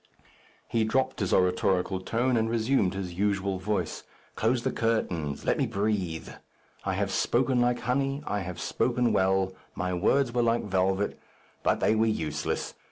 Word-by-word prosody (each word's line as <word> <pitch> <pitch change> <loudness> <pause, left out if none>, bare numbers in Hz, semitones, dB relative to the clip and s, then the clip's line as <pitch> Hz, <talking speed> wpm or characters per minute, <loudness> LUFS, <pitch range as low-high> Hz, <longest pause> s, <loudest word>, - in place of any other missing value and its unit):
He 115 -1 +1
dropt 130 +4 0
his 100 -4 -1
oratorical 90 +1 +2
tone, 120 +6 +1
and 115 -1 +1
resumed 115 -4 +1
his 95 -2 -4
usual 100 0 0
voice. 105 +2 -2 0.3
"Close 115 +2 +1
the - - 0
curtains. 90 -11 -1
Let - - +1
me - - +2
breathe. 100 -5 -1 0.6
I - - -1
have - - -1
spoken 125 +1 +2
like 120 0 +1
honey. 135 +3 0
I 105 - -1
have 90 -2 -6
spoken 125 -1 +1
well. 95 0 +2 0.2
My 90 +1 -2
words 120 +8 +2
were 120 - +2
like 115 0 +2
velvet; 95 0 0 0.4
but - - +1
they - - +4
were 110 +1 +3
useless. 75 -8 -2
105 Hz, 160 wpm, -28 LUFS, 95-120 Hz, 0.6 s, they